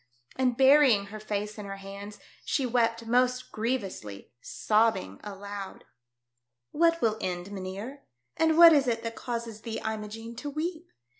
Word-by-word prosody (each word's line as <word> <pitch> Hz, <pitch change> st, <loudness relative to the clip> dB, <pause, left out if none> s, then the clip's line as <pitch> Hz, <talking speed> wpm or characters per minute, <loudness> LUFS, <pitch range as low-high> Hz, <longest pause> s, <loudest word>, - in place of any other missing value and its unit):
and 250 Hz, -2 st, +1 dB
burying 265 Hz, -6 st, +6 dB
her 210 Hz, +2 st, -9 dB
face 210 Hz, 0 st, -4 dB
in 205 Hz, -, -7 dB
her 195 Hz, -, -5 dB
hands 200 Hz, +1 st, -9 dB, 0.3 s
she 275 Hz, -, 0 dB
wept 230 Hz, -1 st, +1 dB
most 250 Hz, +2 st, +1 dB
grievously, 200 Hz, -, -4 dB
sobbing 215 Hz, -, 0 dB
aloud. 200 Hz, -1 st, -7 dB, 0.5 s
" 120 Hz, 0 st, -55 dB
What 335 Hz, 0 st, +4 dB
will 220 Hz, -1 st, +1 dB
end, 180 Hz, +1 st, -4 dB
mynheer? 200 Hz, +8 st, -6 dB, 0.3 s
And 320 Hz, 0 st, +2 dB
what 335 Hz, -1 st, +10 dB
is 280 Hz, -3 st, +3 dB
it 230 Hz, -1 st, -1 dB
that 230 Hz, 0 st, -4 dB
causes 230 Hz, -3 st, -5 dB
thee, 225 Hz, -1 st, -5 dB
Imogene, 220 Hz, +1 st, -5 dB
to 290 Hz, -, -5 dB
weep 325 Hz, +3 st, -4 dB
225 Hz, 150 wpm, -28 LUFS, 200-255 Hz, 0.5 s, what